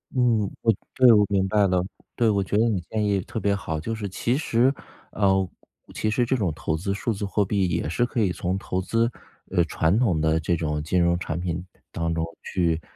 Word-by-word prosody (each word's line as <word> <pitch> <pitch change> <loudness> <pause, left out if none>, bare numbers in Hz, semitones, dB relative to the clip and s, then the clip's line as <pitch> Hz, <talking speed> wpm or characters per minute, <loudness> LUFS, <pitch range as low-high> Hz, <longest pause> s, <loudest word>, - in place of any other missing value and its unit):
嗯， 115 -5 +2
我 115 - +4 0.2
对， 130 -2 +7
我 105 -1 +6
明 95 -1 +1
白 100 -1 +3
了。 90 -1 +1 0.3
对， 120 - +2
我 100 -1 +1
觉 100 - -1
得 115 +2 +4
你 100 -6 0
建 110 -1 -1
议 100 -2 +1
特 115 - -5
别 100 -1 +1
好。 80 -6 -3
就 115 +9 -4
是 105 -3 -4
其 120 +6 -1
实 130 -2 +2 0.4
呃， 95 -2 +2 0.5
其 110 - -1
实 120 +3 +1
这 130 +3 +1
种 100 -8 0
投 80 - -2
资 100 +5 -2
数 115 +3 -1
字 100 0 -4
货 100 0 +1
币 95 -2 +1
也 80 -3 -1
是 120 +9 +1
可 120 - -3
以 100 -4 +2
从 90 +1 -2
投 95 -1 -3
资 115 +4 +1 0.4
呃， 90 -2 +3
传 80 +6 +1
统 95 -11 +2
的 80 +1 +2
这 85 +2 0
种 75 -2 -2
金 90 +4 0
融 85 0 +3
产 85 -2 -3
品 85 -1 -2 0.2
的 - - -31
当 85 0 -2
中 80 0 -1 0.2
去， 85 -3 0
95 Hz, 245 characters per minute, -24 LUFS, 85-110 Hz, 0.5 s, 对